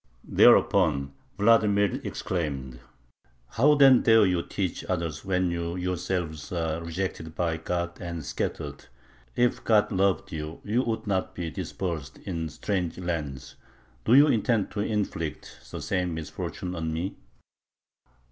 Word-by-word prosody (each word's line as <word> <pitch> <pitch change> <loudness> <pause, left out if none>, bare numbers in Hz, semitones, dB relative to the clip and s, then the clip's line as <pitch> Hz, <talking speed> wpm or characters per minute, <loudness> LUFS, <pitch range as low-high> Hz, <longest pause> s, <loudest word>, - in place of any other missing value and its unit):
Thereupon 75 -8 +4 0.2
Vladimir 105 -2 +3
exclaimed: 70 -8 -3 0.7
"How 145 +6 +4
then 135 -3 +7
dare 115 -2 +6
you 90 -2 +1
teach 90 0 -3
others 85 -4 -3
when 90 -2 +1
you 85 0 -3
yourselves 90 -3 -3
are 80 -2 -2
rejected 85 -1 -4
by 85 -2 0
God 85 +1 -3
and 85 -4 -5
scattered? - - -4 0.5
If 120 0 +1
God 110 -1 +3
loved 95 -3 +1
you, 75 0 -5
you 110 +4 +1
would 115 -3 -2
not 95 -3 -1
be 85 -2 -4
dispersed 80 -4 -4
in 85 -4 -4
strange 90 +2 -2
lands. 80 -7 -4 0.5
Do 120 - +5
you 145 +2 +9
intend 115 -6 +1
to 105 - -5
inflict 100 -7 -3
the - - -6
same 90 -3 -1
misfortune 80 +3 -5
on 80 -2 -3
me?" 85 +4 -3
90 Hz, 130 wpm, -27 LUFS, 80-100 Hz, 0.7 s, you